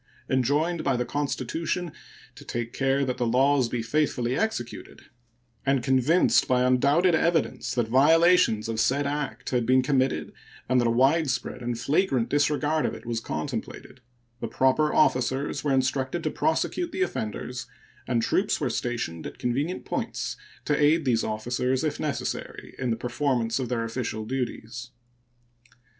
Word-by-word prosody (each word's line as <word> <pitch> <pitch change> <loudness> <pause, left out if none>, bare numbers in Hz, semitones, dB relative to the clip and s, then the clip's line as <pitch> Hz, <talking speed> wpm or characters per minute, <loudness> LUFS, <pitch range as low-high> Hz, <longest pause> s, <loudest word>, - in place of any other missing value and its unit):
Enjoined 145 +6 +1
by 135 -2 +1
the 125 - -1
Constitution 150 +5 -2 0.4
"to - - -13
take 120 -1 -4
care 135 +1 +1
that 125 -1 -2
the 120 - +1
laws 130 +1 +3
be 115 -1 -2
faithfully 125 -2 0
executed," 130 - -3 0.6
and 135 -2 +1
convinced 135 +7 +3
by 125 -1 +3
undoubted 140 +8 +3
evidence 160 -7 0
that 120 -3 +1
violations 155 -2 +4
of 115 -1 -3
said 140 +5 +2
act 145 0 -3
had 125 -2 +1
been 130 +2 +3
committed 130 -1 0 0.3
and 125 0 +3
that 120 - +2
a - - +2
widespread 135 +2 +1
and 120 -1 -3
flagrant 135 -3 +1
disregard 150 +1 +1
of - - -4
it - - -12
was 115 -1 -2
contemplated, 115 +7 -6 0.4
the - - -3
proper 140 +4 +2
officers 130 0 +1
were 145 - 0
instructed 130 +4 0
to - - -1
prosecute 350 -2 -1
the 375 - 0
offenders, 120 - -4 0.4
and 120 -2 +1
troops 200 - +1
were 135 -5 -1
stationed 115 -9 -3
at - - -10
convenient 140 +9 -2
points - - -3 0.3
to 150 - +2
aid 155 +1 +4
these 115 -3 +2
officers, 125 +5 -1
if 155 - -2
necessary, - - -4
in 130 -1 -1
the 115 - +1
performance 120 0 -1
of 125 -3 -3
their 120 -2 -1
official 115 -2 -4
duties. 120 -1 -4
130 Hz, 150 wpm, -26 LUFS, 120-145 Hz, 0.6 s, violations